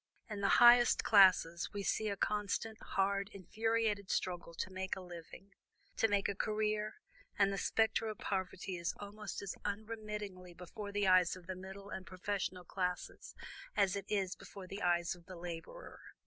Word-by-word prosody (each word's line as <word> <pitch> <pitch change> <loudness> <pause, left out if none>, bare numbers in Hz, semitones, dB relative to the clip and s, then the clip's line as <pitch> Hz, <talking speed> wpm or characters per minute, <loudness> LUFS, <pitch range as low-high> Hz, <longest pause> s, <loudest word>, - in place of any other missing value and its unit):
In 210 -2 -5
the 200 - +3
higher 240 0 +9 0.2
classes 185 -4 +5
we 200 -1 -3
see 215 +2 0
a 200 - -2
constant, 210 +2 -1
hard, 200 +1 0
infuriated 215 +1 0
struggle 175 -2 -2
to 185 - -3
make 190 0 -3
a - - -7
living, 180 +2 -11 0.4
to 225 - +4
make 205 -2 +2
a 200 - -1
career, 215 +1 -1 0.4
and 200 -1 +4
the - - -2
spectre 225 +2 +2
of 215 -2 -4
poverty 185 -1 -3
is 170 0 -2
almost 205 0 -6
as 195 - -3
unremittingly 210 -4 -5
before 200 +4 -7
the 205 0 +1
eyes 185 -1 +5
of 185 -1 -13
the 185 - -4
middle 195 +2 -9
and 185 -2 -6
professional 185 -1 -3
classes 180 -1 -3 0.4
as 195 0 +3
it 200 -1 -4
is 195 -3 0
before 195 -2 -10
the 195 +2 -7
eyes 175 -1 +2
of 175 -1 -16
the 185 - -8
laborer. 175 - -8
195 Hz, 170 wpm, -35 LUFS, 185-210 Hz, 0.4 s, higher